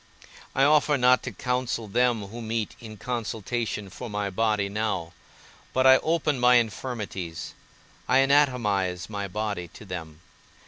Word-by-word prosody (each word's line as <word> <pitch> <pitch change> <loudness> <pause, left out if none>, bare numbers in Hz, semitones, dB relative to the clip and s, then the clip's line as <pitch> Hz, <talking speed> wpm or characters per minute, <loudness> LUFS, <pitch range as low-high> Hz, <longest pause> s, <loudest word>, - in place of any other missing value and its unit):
I 135 - +4
offer 150 0 +4
not 125 0 +5
to - - -5
counsel 125 -3 -2
them 120 0 +1
who 120 +3 -8
meet 110 -1 -3
in 110 -2 -10
consultation 115 -2 -3
for 125 +5 -7
my 105 -1 -2
body 105 0 +1
now, 100 -5 -2 0.6
but 130 0 +2
I 130 0 +9
open 155 -3 0
my 125 0 +6
infirmities, 105 -8 -2 0.5
I - - +4
anatomize 115 -10 +2
my 100 -1 -3
body 105 -3 -3
to 90 - -13
them. 80 -4 -7
110 Hz, 140 wpm, -26 LUFS, 100-125 Hz, 0.6 s, I